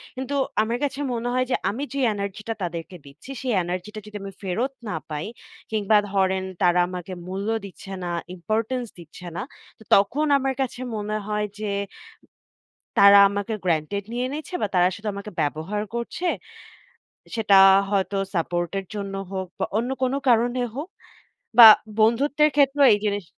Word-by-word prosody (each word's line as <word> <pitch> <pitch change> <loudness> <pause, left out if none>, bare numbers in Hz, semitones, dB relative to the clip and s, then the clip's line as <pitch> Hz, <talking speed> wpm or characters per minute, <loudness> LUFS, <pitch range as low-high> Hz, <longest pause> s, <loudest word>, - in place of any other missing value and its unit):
কিন্তু 265 +2 -4 0.3
আমার 230 +2 -1
কাছে 280 0 -2
মনে 240 +1 -2
হয় 255 0 +1
যে, - - +3
আমি 245 +8 -4
যে, 280 - -2
এনার্জিটা 205 +2 -4
তাদেরকে 170 +1 -5
দিচ্ছি, 150 - -12
সেই 255 -3 -1
এনার্জিটা 185 +5 -5
যদি 210 0 -12
আমি 195 - -6
ফেরত 225 +9 -2 0.2
না 170 - -2
পাই 150 0 -4 0.5
কিংবা, 215 0 +3
ধরেন 190 -1 +1 0.2
তারা 180 -1 +4
আমাকে 180 0 -6
মূল্য 195 +3 -4 0.2
দিচ্ছে 195 0 -11
না, 175 - -3 0.2
ইম্পোর্টেন্স 225 +7 -2
দিচ্ছে 170 +2 -12
না। - - -3 0.4
তো - - -14
তখন 240 +10 +2
আমার 270 0 -1
কাছে 250 -1 -3 0.2
মনে 210 0 -2
হয় 210 0 -1
যে, 210 -2 -3 1.3
তারা 200 0 +8
আমাকে 205 +2 -3
গ্রেন্টেড 170 +4 0
নিয়ে 250 +1 -1
নিয়েছে 310 +5 -7
বা, - - +1
তারা 180 0 +5
শুধু 210 +1 -8
আমাকে 200 +1 -7
ব্যবহার 160 +8 -2
করছে। 235 +9 -4 1.1
সেটা 205 -3 +4 0.3
হয়তো 200 0 0 0.2
সাপোর্টের 175 +3 -2
জন্য 200 -1 -4 0.2
হোক 190 -1 -3
বা, - - +1
অন্য 240 +3 -1
কোন 255 +1 +1 0.2
কারণে 240 +2 +2
হোক 310 +6 -5 0.7
বা, 225 -2 +13 0.3
বন্ধুত্বের 285 +7 +3
ক্ষেত্রেও 280 0 +5
এই 205 - -2
জিনিস 200 -2 -1
210 Hz, 155 wpm, -24 LUFS, 190-245 Hz, 1.3 s, বা